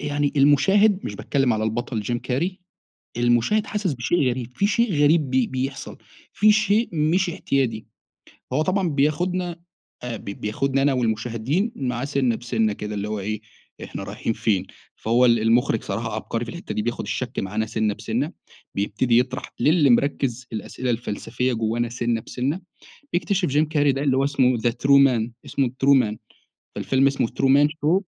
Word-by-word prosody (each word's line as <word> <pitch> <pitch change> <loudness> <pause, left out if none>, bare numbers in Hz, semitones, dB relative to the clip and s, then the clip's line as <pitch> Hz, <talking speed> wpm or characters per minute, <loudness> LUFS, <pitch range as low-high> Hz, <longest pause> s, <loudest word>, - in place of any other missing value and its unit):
يعني 145 -1 -1
المشاهد- 190 +9 +4
مش - - -4
باتكلم 135 -3 0
على 110 0 -1
البطل 115 +1 -2
جيم 120 +3 -2
كاري- 175 +11 -2 0.6
المُشاهد 120 - +2
حاسس 205 -8 -2
بشيء 130 +3 +1
غريب 125 -1 -4
في 200 - +2
شيء 220 -1 +1
غريب 150 -2 +3
بي 130 -2 +2
بيحصل 135 +1 -4 0.4
في 215 +1 +5
شيء 215 +2 +2
مش 170 +4 +1
اعتيادي. 130 -9 -1 0.7
هو 150 +4 +2
طبعًا 185 +1 0
بياخدنا 170 +4 0 0.4
أ 125 -2 -4
ب - - -12
بياخدنا 130 +7 -1
أنا 140 0 +3
والمُشاهدين 120 - -1
معاه 125 -1 -2
سِنّة 135 -5 0
بسِنّة 110 -3 0
كده، 105 +1 -6
اللي 105 0 -3
هو 105 -1 -3
إيه 105 +2 -3 0.4
إحنا - - -7
رايحين - - -3
فين؟ 110 -4 0 0.3
فهو 120 +3 +2
ال 115 -1 +5
المُخرج 115 +1 +2
صراحة 110 +3 -4
عبقري 115 +1 -3
في 115 - -7
الحتّة 170 +1 -7
دي، 105 - -1
بياخد 120 +2 -3
الشَكْ 125 0 -4
معانا 105 +3 -1
سِنّة 110 -1 -1
بسِنّة، 115 - -3 0.4
بيبتدي 110 +4 +1
يطرح 130 +2 -2
للي 150 -3 +4
مِركّز 125 -1 +1
في - - -10
الأسئلة 125 +3 -4
الفلسفية 120 +2 -2
جوانا 115 +1 -1
سِنّة 120 -1 -1
بسِنّة. 135 - -3 0.5
بيكتشف 180 0 0
جيم 150 +3 +2
كاري 145 -3 +2
ده 135 - -3
اللي 135 -2 +2
هو 135 - +2
اسمه 130 -3 +2
the 120 +1 +1
true 140 +4 +4
man 120 -3 0 0.2
اسمه 135 -3 0 0.2
true 140 0 +6
man 105 -2 -3 0.6
فالفيلم 135 +1 +1
اسمه 135 -3 +1
true 135 -1 +1
man 145 +1 +5
show. 155 +4 +1
130 Hz, 170 wpm, -23 LUFS, 115-150 Hz, 0.7 s, true